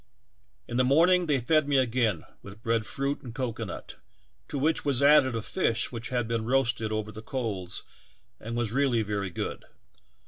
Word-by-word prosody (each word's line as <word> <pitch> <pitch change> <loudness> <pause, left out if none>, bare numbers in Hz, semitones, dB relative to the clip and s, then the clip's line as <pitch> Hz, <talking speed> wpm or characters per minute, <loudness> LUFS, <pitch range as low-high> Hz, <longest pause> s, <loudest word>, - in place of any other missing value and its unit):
In 120 - -3
the 130 - +4
morning 170 +7 +4
they 145 -3 +2
fed 155 +4 +2
me 140 -1 +3
again 115 -8 +1 0.2
with 100 +3 -12
bread 115 -1 0
fruit 140 +1 -2
and 120 -3 -9
cocoanut, 125 -3 -5 0.5
to - - -4
which 155 +4 +1
was 140 -2 +1
added 140 -4 +6
a 115 - -2
fish 115 -9 0
which 115 -1 -5
had 120 -3 -1
been 115 -1 -1
roasted 120 -3 +1
over 110 0 -2
the 110 +1 -9
coals 110 -7 -4 0.6
and 115 +2 -5
was 120 -3 -1
really 125 -3 +2
very 100 -2 -2
good. 85 - -4
120 Hz, 175 wpm, -28 LUFS, 110-140 Hz, 0.6 s, added